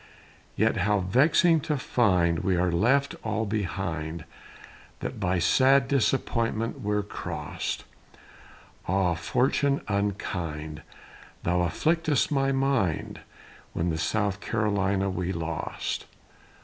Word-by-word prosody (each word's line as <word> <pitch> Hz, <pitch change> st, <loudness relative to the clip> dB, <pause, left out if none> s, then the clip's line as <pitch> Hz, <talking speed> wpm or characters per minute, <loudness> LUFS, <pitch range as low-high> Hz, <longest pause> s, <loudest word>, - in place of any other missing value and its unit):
Yet 110 Hz, +1 st, +2 dB
how 100 Hz, +1 st, +2 dB
vexing 150 Hz, -, +4 dB
to 150 Hz, 0 st, -1 dB
find 90 Hz, -10 st, +2 dB
We 95 Hz, -, +1 dB
are 90 Hz, 0 st, +1 dB
left 135 Hz, +11 st, +2 dB
all 110 Hz, 0 st, -1 dB
behind, 85 Hz, -6 st, -3 dB, 0.8 s
That -, -, -5 dB
by 90 Hz, +1 st, +1 dB
sad 130 Hz, +10 st, +4 dB
disappointment 115 Hz, -4 st, 0 dB
we're 105 Hz, 0 st, 0 dB
cross'd; 100 Hz, -, -5 dB, 1.0 s
Ah, 95 Hz, -1 st, +2 dB
fortune 135 Hz, -, +1 dB
unkind! 90 Hz, -6 st, -3 dB, 0.6 s
Thou 90 Hz, +1 st, +1 dB
afflicted'st 155 Hz, -, +1 dB
my 135 Hz, -1 st, +2 dB
mind, 135 Hz, -, 0 dB, 0.5 s
When 85 Hz, +1 st, 0 dB
the 80 Hz, -, -2 dB
South 100 Hz, +3 st, 0 dB
Carolina 100 Hz, -3 st, 0 dB
we 90 Hz, -1 st, -2 dB
lost. 85 Hz, -1 st, -4 dB
100 Hz, 105 wpm, -27 LUFS, 90-130 Hz, 1.0 s, vexing